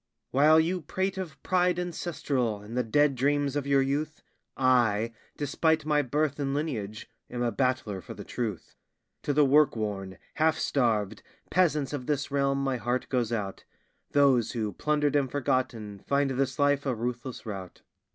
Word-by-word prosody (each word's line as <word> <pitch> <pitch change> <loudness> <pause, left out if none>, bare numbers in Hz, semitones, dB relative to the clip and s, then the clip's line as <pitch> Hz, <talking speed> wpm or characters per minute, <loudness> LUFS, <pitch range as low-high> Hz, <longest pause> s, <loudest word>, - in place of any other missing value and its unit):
While 150 +4 +6
you 175 +3 0
prate 190 +5 -2
of 180 -4 -6
pride 180 -1 +2
ancestral 150 -10 -2
and 105 +3 -9
the 125 - +2
dead 145 +5 +3
dreams 140 +2 +1
of 145 -1 -2
your 140 -1 +4
youth, 150 +3 -2 0.3
I, 115 -4 +3 0.2
despite 155 +2 +1
my 150 -1 +3
birth 145 +2 -1
and 140 -1 -1
lineage, 110 -9 -3 0.2
am 120 0 -3
a 120 - +1
battler 125 -8 -1
for - - -9
the - - -8
truth. 110 -7 -5 0.5
To - - -1
the 145 +1 +4
work 145 +1 +4
worn, 100 -4 -4 0.2
half 160 +1 +3
starved 110 -7 0 0.3
peasants 150 -6 +2
of 130 -4 -4
this 145 -1 -1
realm 140 -1 +1
my 135 -2 0
heart 120 +1 -2
goes 120 -3 0
out 100 -4 -3 0.5
Those 135 -5 +3
who, 110 -4 -2
plundered 150 +4 +1
and 140 -2 +2
forgotten, 120 -6 -1
find 140 -1 +2
this 135 0 -1
life 145 -1 +2
a 130 - +1
ruthless 120 +2 -4
rout. 95 -4 -7
135 Hz, 165 wpm, -28 LUFS, 120-150 Hz, 0.5 s, While